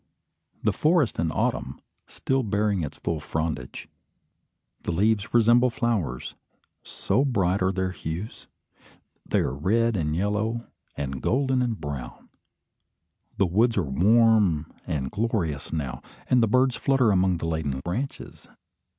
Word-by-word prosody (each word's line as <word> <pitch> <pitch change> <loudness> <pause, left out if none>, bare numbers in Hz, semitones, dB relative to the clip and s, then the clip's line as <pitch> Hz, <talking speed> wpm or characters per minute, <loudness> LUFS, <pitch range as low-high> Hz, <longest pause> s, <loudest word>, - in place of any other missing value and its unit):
The - - +2
forest 155 -5 +2
in 80 -1 0
autumn; - - -2 0.3
still 135 0 -1
bearing 105 -3 0
its 75 -1 -5
full 80 -2 -2
frondage. 75 -3 -4 0.9
The - - -3
leaves 105 +5 +1
resemble 120 +2 +5
flowers, 110 - -2 0.5
so 130 - 0
bright 100 -8 +1
are 95 0 +2
their 95 -1 -1
hues. 90 +5 -6 0.8
They - - +2
are - - -1
red 110 +10 +1
and 75 -4 -1
yellow, 105 +5 -1 0.3
and 70 -2 -4
golden 130 0 +1
and 120 -4 -1
brown. 70 -4 -7 1.1
The 100 - +3
woods 110 +6 +2
are 95 - +2
warm 95 - +3
and 65 -4 -2
glorious 95 -10 -2
now, 70 -6 -3 0.3
and 125 - +4
the 115 - +3
birds 125 +2 +3
flutter 130 -5 +2
among 95 -2 +2
the 80 - -5
laden 80 -5 -2
branches. 110 - -5
100 Hz, 135 wpm, -25 LUFS, 80-115 Hz, 1.1 s, resemble